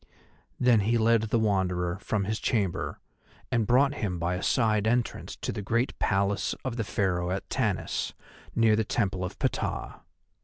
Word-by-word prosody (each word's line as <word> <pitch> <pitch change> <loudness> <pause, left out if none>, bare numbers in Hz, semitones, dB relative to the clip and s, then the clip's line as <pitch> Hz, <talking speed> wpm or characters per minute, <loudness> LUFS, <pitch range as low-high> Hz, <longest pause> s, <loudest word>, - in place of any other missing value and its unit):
Then 125 -3 +5
he 115 +4 +2
led 115 0 +4
the 115 - +2
Wanderer 95 -4 0
from 105 -1 -1
his 110 +2 -2
chamber 100 -7 -1 0.5
and 115 -3 +1
brought 135 +3 +4
him 100 -9 -2
by 85 +1 -1
a 90 - -3
side 110 -4 +2
entrance 120 +1 -1
to - - -4
the - - -4
great 115 +5 -1
Palace 100 -1 +1
of 130 -3 -2
the 115 - -1
Pharaoh 90 -3 0
at 95 +1 -3
Tanis, - - -1 0.4
near 115 -2 +4
the 110 - +1
Temple 100 -4 -1
of 90 - -5
Ptah. - - -2
105 Hz, 165 wpm, -28 LUFS, 95-115 Hz, 0.5 s, Then